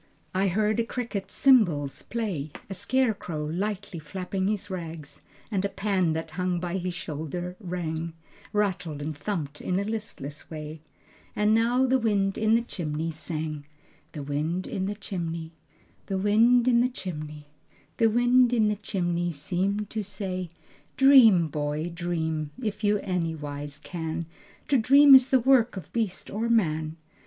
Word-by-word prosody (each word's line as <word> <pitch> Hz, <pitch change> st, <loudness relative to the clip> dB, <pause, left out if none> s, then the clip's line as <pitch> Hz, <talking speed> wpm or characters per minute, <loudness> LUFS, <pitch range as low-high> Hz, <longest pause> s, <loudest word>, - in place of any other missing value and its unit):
I 190 Hz, +2 st, +2 dB
heard 210 Hz, +4 st, +1 dB
a -, -, +3 dB
cricket's 230 Hz, -4 st, -4 dB
cymbals 175 Hz, -, +4 dB
play, 195 Hz, -11 st, -3 dB, 0.2 s
A -, -, -1 dB
scarecrow 200 Hz, -7 st, -1 dB
lightly 190 Hz, +2 st, -3 dB
flapped 180 Hz, +5 st, -8 dB
his 195 Hz, +1 st, 0 dB
rags, 165 Hz, -6 st, -7 dB, 0.3 s
And 195 Hz, -2 st, 0 dB
a 200 Hz, -, 0 dB
pan 190 Hz, -5 st, 0 dB
that 160 Hz, +1 st, -4 dB
hung 180 Hz, -1 st, -1 dB
by 175 Hz, +1 st, -2 dB
his 180 Hz, 0 st, -3 dB
shoulder 170 Hz, +2 st, -5 dB
rang, 170 Hz, -4 st, -4 dB, 0.4 s
Rattled 180 Hz, -7 st, -1 dB
and 150 Hz, +1 st, -4 dB
thumped 150 Hz, -3 st, -4 dB
in 180 Hz, +1 st, 0 dB
a -, -, 0 dB
listless 200 Hz, -10 st, -6 dB
way, 155 Hz, -1 st, -7 dB, 0.5 s
And 210 Hz, +1 st, +3 dB
now 240 Hz, +3 st, +3 dB
the 260 Hz, 0 st, +3 dB
wind 200 Hz, -4 st, +1 dB
in 220 Hz, +1 st, +4 dB
the 230 Hz, -, +2 dB
chimney 165 Hz, -6 st, -3 dB
sang, 155 Hz, -2 st, -4 dB, 0.5 s
The 150 Hz, -, -5 dB
wind 155 Hz, +6 st, -2 dB
in 190 Hz, 0 st, -3 dB
the 205 Hz, -, -3 dB
chimney, 165 Hz, -5 st, -5 dB, 0.6 s
The 195 Hz, -, -1 dB
wind 230 Hz, +5 st, +4 dB
in 235 Hz, -2 st, +5 dB
the 250 Hz, -, +2 dB
chimney, 150 Hz, -9 st, -7 dB, 0.5 s
The 225 Hz, -1 st, +4 dB
wind 245 Hz, +2 st, +4 dB
in 220 Hz, -3 st, +3 dB
the 210 Hz, -, 0 dB
chimney, 175 Hz, -4 st, -1 dB
Seemed 190 Hz, +7 st, -2 dB
to 220 Hz, -, -2 dB
say: 190 Hz, -3 st, -4 dB, 0.5 s
"Dream, 245 Hz, -, +7 dB
boy, 150 Hz, +2 st, -2 dB
dream, 160 Hz, -3 st, -2 dB
If 215 Hz, -3 st, -4 dB
you 210 Hz, 0 st, +3 dB
anywise 150 Hz, -5 st, -3 dB
can. 165 Hz, +1 st, -4 dB, 0.4 s
To 275 Hz, -, +4 dB
dream 275 Hz, +4 st, +7 dB
is 265 Hz, -1 st, +8 dB
the 265 Hz, -, +5 dB
work 245 Hz, -3 st, +3 dB
Of 180 Hz, -, -9 dB
beast 220 Hz, -6 st, -2 dB
or 225 Hz, +3 st, -1 dB
man. 160 Hz, -8 st, +1 dB
185 Hz, 155 wpm, -27 LUFS, 160-215 Hz, 0.6 s, is